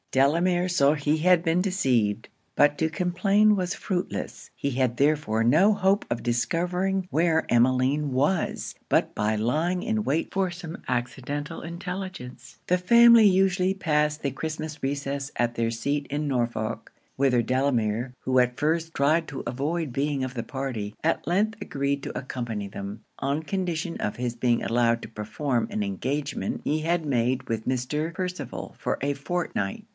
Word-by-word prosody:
Delamere 170 +7 +2
saw 145 -6 +4
he 150 0 0
had 180 +1 +4
been 170 +1 +1
deceived; 130 - +1 0.3
but 145 0 +4
to 160 - +2
complain 195 +5 +3
was 180 -1 -1
fruitless: 180 -3 -4
he 140 - -2
had 125 -2 0
therefore 140 -6 +2
no 160 - +5
hope 200 0 +2
of 120 - -2
discovering 180 +9 0
where 160 0 +2
Emmeline 130 +4 +2
was, 145 +7 0
but - - +2
by 110 +1 +1
lying 160 +11 0
in 220 -2 0
wait 155 +1 -1
for 190 -2 +1
some 175 -1 -7
accidental 135 +5 -3
intelligence. 180 -5 -7
The 180 - +3
family 235 +3 +7
usually 190 -1 +3
passed 150 -4 +1
the 140 - -1
Christmas 155 +2 -5
recess 140 0 -2
at 120 -1 0
their 115 0 0
seat 140 +5 -2
in 145 +2 -2
Norfolk; 120 -4 -2 0.2
whither 130 -3 +3
Delamere, 125 -2 0
who 130 0 0
at 125 0 +1
first 165 +2 0
tried 155 +4 +2
to 135 - -6
avoid 145 +3 -2
being 140 0 0
of 130 - -6
the 120 -3 -3
party, 115 -5 -4
at 165 - +1
length 210 +5 +1
agreed 140 0 -2
to - - -5
accompany 120 -6 -4
them, 100 +2 -7 0.2
on 140 +3 -1
condition 175 -2 -2
of 105 - -2
his 120 -1 -2
being 120 0 +1
allowed 115 0 +2
to - - -6
perform 115 +4 -2
an 105 - -2
engagement 135 +9 -2
he 155 +2 +1
had 165 +1 0
made 130 -1 +1
with 110 -1 -3
Mr. 140 +6 -1
Percival 180 +1 -5
for - - -2
a 140 +1 0
fortnight. 150 - -3
145 Hz, 160 wpm, -26 LUFS, 125-175 Hz, 0.3 s, family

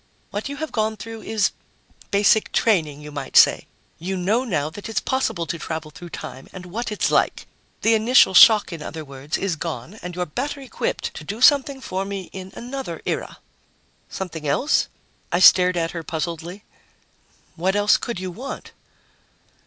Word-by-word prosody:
What 205 +6 -4
you 285 - -5
have 315 +2 -5
gone 220 0 -1
through 225 +1 -8
is 215 -2 0 0.6
basic 205 +2 +3
training, 155 -10 +1
you 150 0 -9
might 140 -2 -2
say. - - +6 0.3
You 190 +3 -3
know 205 +7 +1
now 155 - -1
that 205 +6 -8
it's 225 - 0
possible 260 -10 -1
to 165 +2 -4
travel 160 -1 -5
through 175 +2 -10
time, 130 -4 -8
and 185 -1 -9
what 220 +6 -4
it's 210 - 0
like. - - +1 0.4
The 225 - +5
initial 225 -2 +5
shock, 210 0 +7
in 165 - -7
other 155 0 -6
words, 140 +2 -4
is 195 -4 -1
gone 160 - -6
and 180 -1 -6
you're 180 0 -1
better 275 - -4
equipped 265 -3 -3
to 160 - -8
do 205 +8 -5
something 275 0 +4
for 190 -5 -3
me 195 -2 -6
in 190 0 -8
another 265 +2 -6
era." - - -3 0.7
"Something 165 -5 -5
else?" 255 - +2 0.4
I 175 - +2
stared 180 -1 +7
at 165 -1 0
her 170 - -5
puzzledly. 170 +4 -5 0.9
"What 185 +4 0
else 205 0 +4
could 235 -6 -4
you 185 -1 -4
want?" 255 +10 -7
190 Hz, 175 wpm, -22 LUFS, 165-220 Hz, 0.9 s, shock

